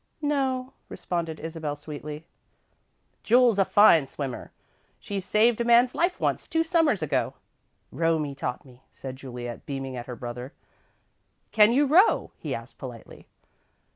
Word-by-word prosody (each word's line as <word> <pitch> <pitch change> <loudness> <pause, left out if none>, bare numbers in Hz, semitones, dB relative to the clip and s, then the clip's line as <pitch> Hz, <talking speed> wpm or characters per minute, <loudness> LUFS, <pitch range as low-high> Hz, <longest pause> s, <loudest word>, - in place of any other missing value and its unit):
"No," 265 -3 -1 0.2
responded 165 -3 -4
Isabel, 160 -2 -4
sweetly. 150 +1 -8 1.0
"Jule's 240 -2 +4
a 195 - +4
fine 170 -10 +5
swimmer. 135 -3 -6 0.5
She 200 -1 -4
saved 215 +4 +2
a - - +2
man's 240 +1 +4
life 350 +2 0
once, - - -1
two 325 0 +1
Summers 325 -2 +2
ago." - - -1 0.6
"Romie 160 -3 0
taught 135 -1 -5
me," 125 -1 -18
said 130 -1 -8
Juliet, 125 -3 -8
beaming 135 -2 -4
at 120 -1 -7
her 125 - -6
brother. 125 +3 -7 1.0
"Can 215 +1 +6
you 280 +4 +3
row?" 340 +10 +4
he - - -3
asked, - - -10
politely. - - -10
165 Hz, 140 wpm, -26 LUFS, -, 1.0 s, Can